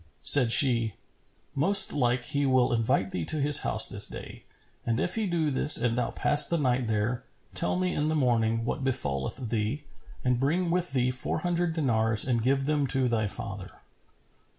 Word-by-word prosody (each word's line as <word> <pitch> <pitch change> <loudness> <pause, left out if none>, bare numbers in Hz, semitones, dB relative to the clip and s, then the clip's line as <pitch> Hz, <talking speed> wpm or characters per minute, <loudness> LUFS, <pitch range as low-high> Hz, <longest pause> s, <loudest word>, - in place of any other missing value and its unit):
Said 125 -5 +6
she, 115 -5 +5 0.6
"Most 190 +9 +1
like 125 -2 -1
he 140 +3 -3
will 130 -2 +1
invite 110 -4 -2
thee 90 - -5
to 155 - -2
his 145 +1 +4
house - - +3
this - - +4
day; - - -11 0.4
and 115 0 -3
if 180 - -2
he 220 -2 -2
do 165 -4 -2
this 145 +3 +7
and 120 -2 -1
thou 125 -1 -3
pass 145 0 +3
the 170 - -2
night 130 -4 -2
there, 110 +3 -3 0.3
tell - - 0
me 180 0 -3
in 150 - -3
the 155 - -2
morning 115 -4 -1
what 130 - -5
befalleth 115 - -4
thee 115 +6 -4 0.4
and 125 -1 0
bring 170 +6 -2
with 175 -4 -3
thee 125 -1 -1
four 130 +4 -4
hundred 175 -1 -2
dinars 110 -7 +1
and 120 -3 -2
give 135 +3 -1
them 145 -1 -1
to 130 -1 -1
thy 110 -3 -2
father." 100 0 -8
130 Hz, 185 wpm, -25 LUFS, 115-150 Hz, 0.6 s, this